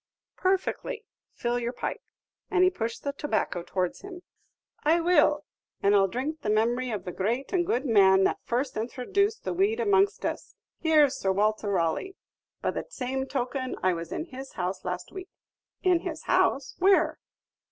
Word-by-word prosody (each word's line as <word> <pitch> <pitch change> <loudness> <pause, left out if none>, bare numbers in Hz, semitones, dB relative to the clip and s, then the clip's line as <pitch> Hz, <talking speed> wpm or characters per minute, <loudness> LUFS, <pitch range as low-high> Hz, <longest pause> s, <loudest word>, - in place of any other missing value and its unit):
"Perfectly; 390 +5 -1 0.3
fill 240 0 -1
your 240 +1 -3
pipe." - - -4 0.5
And 370 -2 +3
he 370 - +5
pushed 230 -8 -4
the 280 - -2
tobacco 225 -10 -1
towards 180 0 -2
him. 370 -2 -9 0.6
"I 320 +3 +4
will; 300 -3 +3 0.4
and 200 - +4
I - - +6
'll 195 - +4
drink 275 +9 -3
the 210 - -2
memory 240 +4 +1
of 215 -4 -4
the 180 - -4
great 235 - -2
and 350 -2 +2
good 255 +4 0
man 195 -5 +5
that - - +1
first 255 +3 -1
intro 245 +3 -4
duced 405 - +1
the - - -2
weed 400 +6 +1
amongst 405 -3 +2
us - - -4 0.2
Here's 305 -4 +4
Sir 190 - +1
Walter 210 +2 +1
Raleigh! 185 - 0 0.5
By - - +1
the - - -4
same 265 - -3
token, 255 -1 -2
I 185 -1 +3
was 165 -1 -6
in 320 - -3
his 270 -4 -9
house 185 +1 -3
last 180 0 -4
week." 375 -1 -8 0.5
"In 365 -3 +4
his 330 -3 -6
house! 270 -1 +2
where?" 385 +2 +4
265 Hz, 175 wpm, -27 LUFS, 210-355 Hz, 0.6 s, I